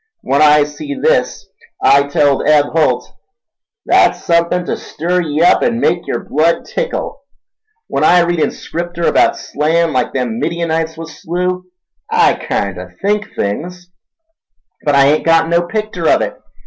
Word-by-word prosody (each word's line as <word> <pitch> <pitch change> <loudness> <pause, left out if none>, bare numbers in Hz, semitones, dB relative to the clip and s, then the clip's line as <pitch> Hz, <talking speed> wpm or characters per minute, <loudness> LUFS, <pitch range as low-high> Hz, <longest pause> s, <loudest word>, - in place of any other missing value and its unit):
When 140 +2 0
I 150 -1 +6
see 280 - -6
this 475 - 0 0.3
I 140 0 +4
telled 145 -1 +1
Eb 150 -1 +4
Holt, 160 -1 +1 0.8
'That's - - +3
suthin' 170 +1 +1
ta - - -2
stir 180 +3 -2
ye 155 -1 -1
up 175 - +4
an' 235 -1 0
make 175 -7 0
yer - - -3
blood 160 +4 +1
tickle!' - - -4 0.6
When - - -2
I 175 0 +5
read 175 0 0
in - - +2
Scripter 170 0 -6
about - - +3
slayin'—like 155 -3 0
them 120 -3 -3
Midianites 165 -1 -2
was 165 0 -9
slew—I 180 +1 -2
kinder 90 -2 -4
think 210 +1 -2
things, 175 - -4 0.9
but 145 -1 +1
I 140 0 +5
ain't 150 +2 +2
got 165 0 +3
no 170 0 +3
picter 210 -4 -2
of - - +3
it. - - -3
165 Hz, 150 wpm, -15 LUFS, 150-180 Hz, 0.9 s, I